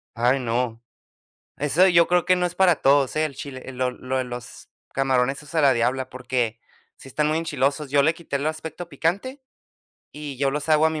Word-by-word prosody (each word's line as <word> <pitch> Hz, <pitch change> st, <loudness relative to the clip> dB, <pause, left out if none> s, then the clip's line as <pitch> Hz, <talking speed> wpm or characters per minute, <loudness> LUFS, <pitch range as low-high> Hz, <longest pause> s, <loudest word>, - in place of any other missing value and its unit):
Ay, 125 Hz, +3 st, +2 dB
no. 115 Hz, -1 st, -1 dB, 0.8 s
Eso 160 Hz, +6 st, +3 dB
yo 170 Hz, -2 st, +5 dB
creo 180 Hz, -1 st, +2 dB
que 185 Hz, -, +4 dB
no 180 Hz, 0 st, 0 dB
es 175 Hz, -, -10 dB
para 180 Hz, -4 st, +4 dB
todos, 140 Hz, 0 st, +3 dB
¿eh? 155 Hz, 0 st, +2 dB
El 140 Hz, -4 st, -5 dB
chile, 135 Hz, -1 st, -8 dB
lo 125 Hz, 0 st, -1 dB
lo 130 Hz, +1 st, -3 dB
los 125 Hz, -1 st, -9 dB, 0.3 s
camarones 135 Hz, 0 st, +1 dB
esos 150 Hz, +2 st, -12 dB
a 160 Hz, -, +3 dB
la 135 Hz, -2 st, +5 dB
diabla, 125 Hz, +2 st, 0 dB
porque 125 Hz, -3 st, -2 dB, 0.4 s
sí -, -, -14 dB
están 150 Hz, +3 st, 0 dB
muy 155 Hz, +1 st, +1 dB
enchilosos. 145 Hz, -2 st, -1 dB
Yo 145 Hz, -1 st, +5 dB
le 160 Hz, +3 st, +2 dB
quité 160 Hz, -5 st, -4 dB
el 145 Hz, +3 st, -2 dB
aspecto 160 Hz, +2 st, -5 dB
picante 255 Hz, -, -2 dB, 0.7 s
y 145 Hz, -3 st, -8 dB
yo 140 Hz, -1 st, +2 dB
los 150 Hz, +2 st, -4 dB
hago 155 Hz, +1 st, +5 dB
a -, -, +2 dB
mi 155 Hz, -1 st, -3 dB
140 Hz, 205 wpm, -24 LUFS, 130-160 Hz, 0.8 s, yo